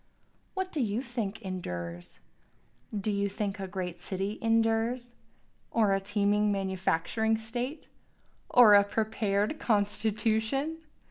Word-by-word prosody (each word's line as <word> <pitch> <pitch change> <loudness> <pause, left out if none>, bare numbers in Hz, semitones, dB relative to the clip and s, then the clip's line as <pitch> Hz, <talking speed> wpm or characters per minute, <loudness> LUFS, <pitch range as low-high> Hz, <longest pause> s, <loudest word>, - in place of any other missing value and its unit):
What 380 -1 -2
do 305 - -1
you 225 +2 -1
think 230 -4 -4
endures? 90 - -6 0.7
Do 210 0 -2
you 200 0 0
think 200 0 -3
a 190 - -4
great 180 -2 -5
city 195 +3 -3
endures? 230 +2 +1 0.6
Or 215 -4 +3
a 195 - +2
teeming 205 +1 +1
manufacturing 195 +3 0
state? 240 +6 -5 0.6
or 235 -4 +8
a 200 0 +8
prepared 215 +3 0
constitution? 220 +7 +1
210 Hz, 115 wpm, -29 LUFS, 195-225 Hz, 0.7 s, or